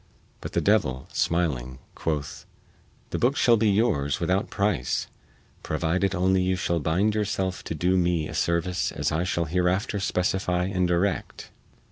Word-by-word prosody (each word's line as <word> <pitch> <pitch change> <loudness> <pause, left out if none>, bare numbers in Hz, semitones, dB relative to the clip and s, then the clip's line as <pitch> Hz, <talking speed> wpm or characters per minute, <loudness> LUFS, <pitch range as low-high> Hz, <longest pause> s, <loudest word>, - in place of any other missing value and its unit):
But - - -7
the - - +1
devil, 65 -12 +1
smiling, 65 -7 0 0.2
quoth: 75 -3 -4 0.6
"The - - -2
booke 130 +4 +2
shall 120 -4 +5
be 110 -1 +2
yours 95 - +1
without 90 +4 0
price 100 -11 0 0.6
provided 85 +5 0
only 95 +1 +2
you 95 0 +1
shall 85 -2 -1
bind 90 +8 +1
yourself 100 -3 -2
to - - -4
do 90 +4 +1
me 85 -3 +1
a - - -8
service 85 +2 0
as - - -2
I 80 +3 0
shall 85 -2 -1
hereafter 90 - 0
specify 90 -1 0
and 90 -1 0
direct." 90 +2 -1
90 Hz, 150 wpm, -26 LUFS, 80-100 Hz, 0.6 s, shall